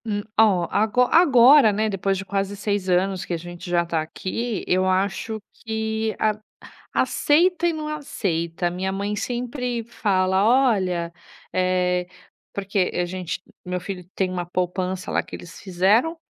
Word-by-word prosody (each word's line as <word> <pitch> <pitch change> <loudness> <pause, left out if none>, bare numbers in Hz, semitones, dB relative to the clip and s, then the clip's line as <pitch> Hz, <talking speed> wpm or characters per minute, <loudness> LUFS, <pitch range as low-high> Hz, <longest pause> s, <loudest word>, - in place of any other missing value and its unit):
Hum, 205 -2 -2 0.2
ó, 190 -6 +4
ago 220 +4 +2
agora, 275 -6 +7
né, 215 +2 0
depois 195 -1 -1
de 195 - -5
quase 195 0 -2
6 200 -2 -2
anos 185 +1 +1
que - - -4
a - - 0
gente 175 +2 -9
já 175 -1 +2
tá 165 -2 -1
aqui, 205 +7 -4
eu 185 +1 +2
acho 195 +3 -1
que 220 -1 -3
a 215 -1 +1 0.5
aceita 345 +4 +2
e - - +2
não 310 -2 -5
aceita, 175 - -2
a - - -2
minha 185 +2 -2
mãe 200 +2 -2
sempre 245 0 -3
fala: 190 -4 +1
"Olha", 195 -9 +2 0.4
eh, 180 -1 +1 0.5
porque 195 -1 -1
a 180 - +1
gente 180 0 -5 0.2
meu 180 0 -2
filho 180 0 -6
tem 190 -1 0
uma 180 -1 -3
poupança 180 +1 -2
lá - - 0
que - - -8
eles 170 -1 -12
fizeram, 205 - +2
195 Hz, 160 wpm, -23 LUFS, 180-220 Hz, 0.5 s, agora